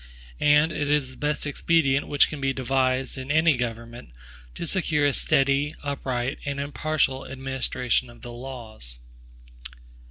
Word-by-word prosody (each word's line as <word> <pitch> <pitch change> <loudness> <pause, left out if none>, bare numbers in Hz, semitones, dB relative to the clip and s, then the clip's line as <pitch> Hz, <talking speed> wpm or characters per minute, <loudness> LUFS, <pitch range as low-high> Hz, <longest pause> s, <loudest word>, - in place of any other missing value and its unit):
And 150 +2 +5
it 145 -2 -2
is 145 -3 +1
the - - -14
best 150 0 -1
expedient 145 -1 +2
which 145 -1 +5
can 150 - -7
be 135 0 +1
devised 130 0 0
in 130 +1 -7
any 160 0 +4
government, 115 - -5 0.5
to - - -4
secure 160 -4 +1
a 145 - +3
steady, 140 +3 +2
upright, 130 -2 -2
and 145 -1 -3
impartial 140 -1 -1
administration 130 -2 -1
of 120 - -15
the 120 - -7
laws. 115 - -8
135 Hz, 140 wpm, -25 LUFS, 130-145 Hz, 0.5 s, And